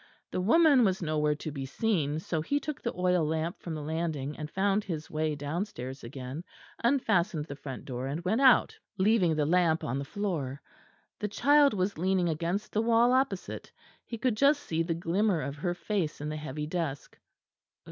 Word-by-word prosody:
The 185 - -1
woman 285 - +5
was 190 -3 +1
nowhere 150 -1 +1
to 155 +1 -6
be 140 -2 -5
seen; 150 -1 0
so 160 0 -2
he 285 - 0
took 295 0 -5
the 235 - -2
oil 180 -2 +2
lamp 160 +2 -2
from 165 -2 -5
the 150 - -5
landing, 155 -2 -2
and 150 -1 -6
found 195 +3 +1
his 160 -5 -5
way 155 -1 0
downstairs 145 - -4
again, 130 +5 -6 0.4
unfastened 215 - +2
the 140 - -7
front 135 -2 -8
door, 130 0 -4
and 155 +6 -4
went 220 +8 +1
out, 260 -2 +5 0.2
leaving 190 -4 +3
the 150 -1 +1
lamp 165 0 +2
on 130 +4 -2
the - - -3
floor. 150 -6 -3 0.6
The 210 - -1
child 280 +4 +4
was 185 -2 -1
leaning 185 -1 +2
against 170 +6 -2
the 215 - +2
wall 235 +2 +4
opposite; 260 -8 -1 0.3
he 230 - -6
could 245 -1 +1
just 280 +5 +3
see 165 0 -1
the 165 0 -1
glimmer 180 +3 +1
of 140 -1 -4
her 175 +3 -2
face 180 -3 -2
in 150 +1 -4
the 155 - -3
heavy 150 0 -5
dusk. 155 -3 -4
170 Hz, 190 wpm, -29 LUFS, 150-210 Hz, 0.6 s, woman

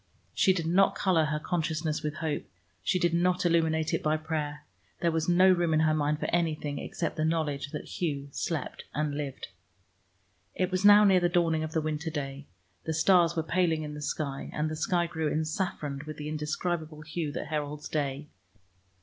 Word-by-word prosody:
She 190 - +4
did 175 -3 -1
not 195 +4 +3
color 180 -6 +2
her 150 0 -1
consciousness 155 -1 -1
with 150 -1 -3
hope, 155 -2 -2 0.4
she 185 - +1
did 175 -2 +1
not 180 +1 +2
illuminate 160 -1 +2
it 165 - +1
by 155 0 +1
prayer; 150 -2 -4 0.3
there 170 - +2
was 160 +1 0
no 185 +2 +6
room 175 -3 +2
in 155 - +3
her 155 -1 +3
mind 150 0 +1
for - - -2
anything 155 -4 0
except - - -4
the 155 - 0
knowledge 155 -3 -1
that - - -6 0.2
Hugh 145 -5 -1
slept 155 0 -3
and 150 -1 0
lived. 140 -2 -5 1.1
It 185 0 0
was 185 +1 0
now 205 +1 +9
near 190 -3 +6
the 175 0 +2
dawning 165 -3 +2
of 155 0 -5
the 160 - +1
winter 155 +1 -2
day; 140 -2 -5 0.4
the 160 - -2
stars 170 0 +4
were 160 - 0
paling 165 -2 +1
in 150 0 -6
the 150 - -7
sky, 145 -1 -3
and 155 +1 -1
the - - -3
sky 175 +2 +1
grew 160 -2 -2
ensaffroned 155 -3 -2
with 155 -1 -7
the 150 0 -5
indescribable 155 +1 -3
hue 155 -1 -3
that - - -5
heralds 150 -1 -3
day. 145 -1 -2
155 Hz, 190 wpm, -29 LUFS, 150-170 Hz, 1.1 s, now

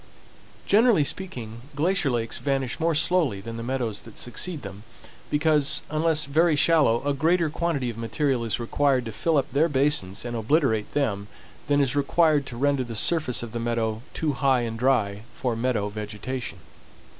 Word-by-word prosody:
Generally 220 -5 +4
speaking, 120 -10 -4
glacier 160 0 +1
lakes 115 -2 -2
vanish 135 -3 -2
more 165 0 +1
slowly 155 - +2
than 115 +4 -7
the 115 - -5
meadows 120 -3 -3
that 115 - -14
succeed 150 +5 -3
them, 100 0 -9 0.5
because, 150 -1 +3
unless 155 0 +2
very 155 +3 +2
shallow, 145 -7 +3
a 145 - +2
greater 160 +3 +1
quantity 150 -7 -1
of 115 - -10
material 125 +2 -1
is 115 -1 -1
required 130 +1 +1
to 115 - -5
fill 130 +10 0
up 135 - -1
their 155 +4 +3
basins 130 -9 +1
and 120 0 -4
obliterate 115 -2 +1
them 105 -9 -1 0.4
than 145 0 +2
is 140 -1 +1
required 145 0 +2
to 120 - -6
render 140 0 +1
the 120 -2 -7
surface 130 0 +2
of 115 - -7
the 120 - -4
meadow 115 -2 -2
too 155 -2 0
high 135 -2 +2
and 115 -1 -4
dry 110 -6 +1
for 125 -3 -2
meadow 115 -3 -1
vegetation. 105 +3 -5
130 Hz, 170 wpm, -25 LUFS, 115-150 Hz, 0.5 s, Generally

